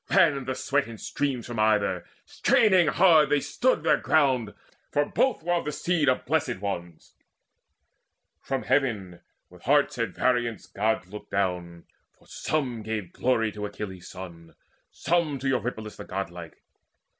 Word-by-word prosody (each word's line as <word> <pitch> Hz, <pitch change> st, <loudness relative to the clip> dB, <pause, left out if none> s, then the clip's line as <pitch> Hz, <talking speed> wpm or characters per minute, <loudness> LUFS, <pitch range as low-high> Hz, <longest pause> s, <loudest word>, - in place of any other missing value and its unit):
Ran 140 Hz, -5 st, +4 dB
the 130 Hz, 0 st, -2 dB
sweat 140 Hz, -2 st, 0 dB
in 115 Hz, -1 st, -9 dB
streams 130 Hz, 0 st, -2 dB
From 120 Hz, -2 st, -5 dB
either: 105 Hz, -5 st, +2 dB, 0.2 s
straining 190 Hz, -7 st, +3 dB
hard 160 Hz, -2 st, +5 dB
they 145 Hz, 0 st, +3 dB
stood 245 Hz, -, 0 dB
their -, -, +4 dB
ground, 130 Hz, -8 st, +2 dB, 0.3 s
For 145 Hz, 0 st, +1 dB
both 260 Hz, -, 0 dB
were 175 Hz, +1 st, 0 dB
of 170 Hz, -, 0 dB
the 150 Hz, -, -2 dB
seed 160 Hz, -2 st, +1 dB
of 130 Hz, -, 0 dB
Blessed -, -, 0 dB
Ones. 85 Hz, -4 st, -6 dB, 1.3 s
From 135 Hz, -1 st, -3 dB
Heaven, 105 Hz, -11 st, 0 dB, 0.3 s
with 90 Hz, -1 st, -16 dB
hearts 140 Hz, 0 st, +2 dB
at 115 Hz, -, -2 dB
variance, 120 Hz, -4 st, 0 dB
Gods 105 Hz, -3 st, -1 dB
looked 105 Hz, -, -9 dB
down; 90 Hz, -3 st, -2 dB, 0.3 s
For -, -, -25 dB
some 130 Hz, -7 st, -2 dB
gave 105 Hz, -5 st, -4 dB
glory 115 Hz, -4 st, +1 dB
to 105 Hz, 0 st, -5 dB
Achilles' 95 Hz, -3 st, -8 dB
son, 85 Hz, -3 st, -10 dB, 0.3 s
Some 165 Hz, -4 st, 0 dB
to 135 Hz, +1 st, -4 dB
Eurypylus 120 Hz, -4 st, -2 dB
the 105 Hz, -, -8 dB
godlike. 85 Hz, -3 st, -6 dB
115 Hz, 150 wpm, -26 LUFS, 100-145 Hz, 1.3 s, hard